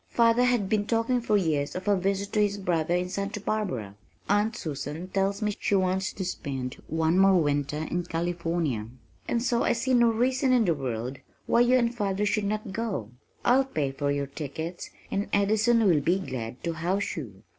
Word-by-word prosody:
Father 235 +1 +4
has 245 -2 +3
been 205 +1 0
talking 235 +2 +1
for 215 -3 +2
years 155 -6 0
of 185 +2 -5
a 205 - +4
visit 195 +2 -1
to 215 - +3
his 205 -1 +1
brother 175 -3 0
in 180 0 0
Santa 200 +2 -3
Barbara. 185 - -2 0.3
Aunt 210 +3 +2
Susan 155 - -5
tells 195 +2 0
me 210 0 0
she 205 - +1
wants 190 0 +1
to 190 - -4
spend 135 -7 -4
one 160 +2 +1
more 195 -1 +6
winter 145 0 0
in 175 0 -1
California, 165 -8 -2 0.4
and 235 -1 0
so 240 -2 +1
I - - +3
see 250 +3 -1
no 240 -1 +5
reason 255 +3 +2
in 240 -3 +4
the 170 - +3
world 130 -2 -4 0.3
why - - +3
you 245 +1 +5
and 235 -1 +1
father 205 -3 -1
should 210 0 0
not 210 -1 -3
go. 200 - -3 0.3
I'll 265 +2 +5
pay 150 - -2
for 140 +1 -2
your 140 0 0
tickets 160 +5 -6 0.2
and 200 +1 -1
Addison 220 +3 +3
will 165 -7 +4
be 175 +6 +2
glad 125 -10 -6
to 170 - -1
house 180 +5 -1
you. 110 - -8
190 Hz, 195 wpm, -27 LUFS, 155-215 Hz, 0.4 s, more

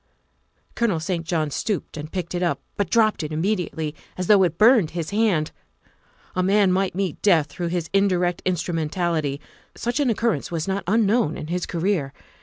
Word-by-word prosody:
Colonel 220 -8 +1
St. 170 +1 -2
John 155 -4 0
stooped 205 +6 -3
and 155 0 -7
picked 180 -2 -4
it 175 - -2
up, 175 - 0 0.2
but 200 -4 -1
dropped 220 -4 +3
it 155 -1 -4
immediately 160 -3 -1 0.2
as 185 - -2
though 200 +1 +6
it 170 -3 +1
burned 220 -6 +5
his 165 0 -3
hand. 200 -8 +1 0.8
A 185 - +1
man 195 +1 +3
might 190 -1 0
meet 190 -4 -2
death 170 -7 +4
through 170 +4 -5
his 170 -1 -2
indirect 180 -3 +2
instru 180 -1 -1
mentality; 160 -3 -1 0.4
such 240 +4 -2
an 280 -3 +2
occurrence 225 - 0
was 165 -1 -3
not 195 +1 -1
unknown 215 -4 +2
in - - -6
his 180 0 -2
career. 170 -5 -1
180 Hz, 180 wpm, -23 LUFS, 160-200 Hz, 0.8 s, though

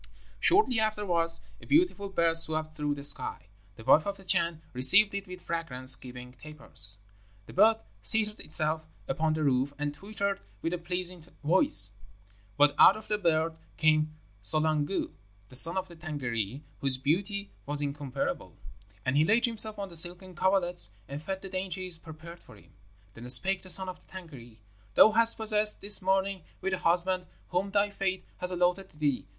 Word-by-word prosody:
"Shortly 345 - +3
afterwards 190 -6 0 0.2
a - - -14
beautiful 295 - +1
bird 170 -3 0
swept 155 -1 +2
through 150 -1 -3
the 140 - -10
sky. 145 - +3 0.3
The 115 - -14
wife 155 - +3
of 200 0 -4
the 195 - -16
Chan 170 -3 -1
received 185 +12 +5
it 200 0 -6
with 180 -1 -11
fragrance 130 -6 +6
giving 125 -1 -12
tapers. 135 -8 +1 0.5
The - - -14
bird 220 +3 +3 0.2
seated 215 -1 +4
itself 155 +1 -2 0.3
upon 155 +3 -2
the 155 - -3
roof 135 0 -1
and 145 0 -4
twittered 200 +3 -5 0.2
with 165 - -3
a 180 - -4
pleasing 180 0 -5 0.2
voice; 125 - +4 0.7
but 145 0 +4
out - - +6
of 215 - -14
the 210 0 -1
bird 160 -2 -1 0.2
came 155 -1 +1 0.3
Solangdu, 155 - -1 0.4
the - - -15
Son 165 +7 0
of 190 0 -3
the 170 - -15
Tângâri, 135 - -5 0.2
whose 135 -2 +1
beauty 195 +9 -2 0.2
was 145 0 +1
incomparable, 140 -1 -5 0.5
and 130 +1 -1
he 150 - +3
laid 220 +8 +2
himself 220 -2 -3
on 200 -1 -7
the 170 - -11
silken 175 +3 +2
coverlets 180 - +1
and 140 +2 -8
fed 190 +5 -5
of 190 - -20
the 195 - -8
dainties 185 -2 -6
prepared 165 +2 -13
for - - -18
him. 100 - -22 0.4
Then 120 +3 -11
spake 190 +9 +4
the 185 - -12
son 190 +1 +7
of 185 - -8
the - - -28
Tângâri, 140 -12 -13 0.4
'Thou 220 - +6
hast 230 +1 +3
passed 215 -1 +2
this 205 +1 +4
morning 190 0 -1 0.2
with 190 - -4
the 190 - -3
husband 180 +2 -1 0.2
whom 185 +2 -2
thy 205 +1 0
fate 190 -2 -3
has 180 - 0
allotted 180 +1 -1
to - - -23
thee. 145 -4 -2
170 Hz, 180 wpm, -27 LUFS, 150-195 Hz, 0.7 s, son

